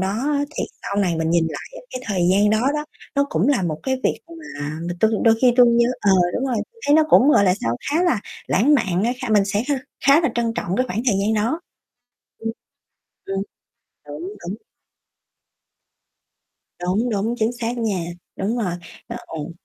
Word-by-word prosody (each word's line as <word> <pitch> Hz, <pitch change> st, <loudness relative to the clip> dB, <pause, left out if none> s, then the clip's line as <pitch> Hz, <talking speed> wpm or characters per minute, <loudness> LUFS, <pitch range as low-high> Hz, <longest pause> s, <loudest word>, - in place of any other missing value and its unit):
đó 190 Hz, -, 0 dB
á 285 Hz, +6 st, 0 dB
thì -, -, -1 dB, 0.2 s
sau 200 Hz, -, -4 dB
này 175 Hz, -3 st, 0 dB
mình 160 Hz, 0 st, 0 dB
nhìn 170 Hz, -1 st, +3 dB
lại -, -, -9 dB
cái 255 Hz, -, -6 dB
thời 180 Hz, -5 st, +1 dB
gian 205 Hz, +2 st, +4 dB
đó 215 Hz, +1 st, +2 dB
đó 300 Hz, 0 st, -2 dB, 0.3 s
nó 280 Hz, 0 st, +2 dB
cũng 180 Hz, -, +1 dB
là 260 Hz, -10 st, +2 dB
một 155 Hz, -3 st, -2 dB
cái 260 Hz, -1 st, 0 dB
việc -, -, +1 dB
mà 305 Hz, -, -7 dB, 0.2 s
mà 175 Hz, -, -3 dB
tui 220 Hz, -, +4 dB
đôi 225 Hz, -1 st, +6 dB
khi 250 Hz, -2 st, +5 dB
tui 245 Hz, -1 st, +8 dB
nhớ 235 Hz, 0 st, +4 dB
ờ 200 Hz, -, +3 dB, 0.2 s
đúng 265 Hz, -, -1 dB
rồi 245 Hz, -3 st, 0 dB, 0.2 s
tui 455 Hz, -, -23 dB
thấy 290 Hz, -, +5 dB
nó 315 Hz, -, +6 dB
cũng, 275 Hz, 0 st, +6 dB
gọi 200 Hz, -, +5 dB
là 180 Hz, -1 st, +4 dB
sao, 115 Hz, +1 st, -1 dB
khá 325 Hz, +4 st, +2 dB
là 330 Hz, -, +2 dB, 0.3 s
lãng 275 Hz, +9 st, +3 dB
mạn 190 Hz, -8 st, +1 dB
á 240 Hz, -, +1 dB, 0.2 s
kh -, -, -3 dB
mình 205 Hz, -2 st, +5 dB
sẽ 205 Hz, +2 st, 0 dB
kh -, -, +2 dB, 0.3 s
khá 280 Hz, +4 st, +6 dB
là 325 Hz, -, +1 dB
trân 230 Hz, -1 st, 0 dB
trọng 185 Hz, -2 st, -2 dB
cái 255 Hz, -, +1 dB
khoảng 215 Hz, +1 st, -2 dB
thời 225 Hz, -, +4 dB
gian 215 Hz, +2 st, +1 dB
đó. 230 Hz, +11 st, 0 dB, 0.8 s
Ừm. 225 Hz, -, -3 dB, 0.7 s
Ừm. 195 Hz, 0 st, -2 dB, 0.7 s
Đúng, 145 Hz, +2 st, -7 dB, 0.3 s
đúng. 205 Hz, -, -4 dB, 2.2 s
Đúng, 195 Hz, +7 st, 0 dB
đúng, 220 Hz, +3 st, -1 dB
chính 220 Hz, +2 st, +1 dB
xác 240 Hz, 0 st, -4 dB
nha, 210 Hz, -7 st, -1 dB, 0.3 s
đúng 215 Hz, +5 st, -1 dB
rồi, 185 Hz, -7 st, -1 dB, 0.3 s
ơ, 235 Hz, -, -6 dB
ồ. 160 Hz, +1 st, -6 dB
220 Hz, 205 wpm, -21 LUFS, 190-255 Hz, 2.2 s, tui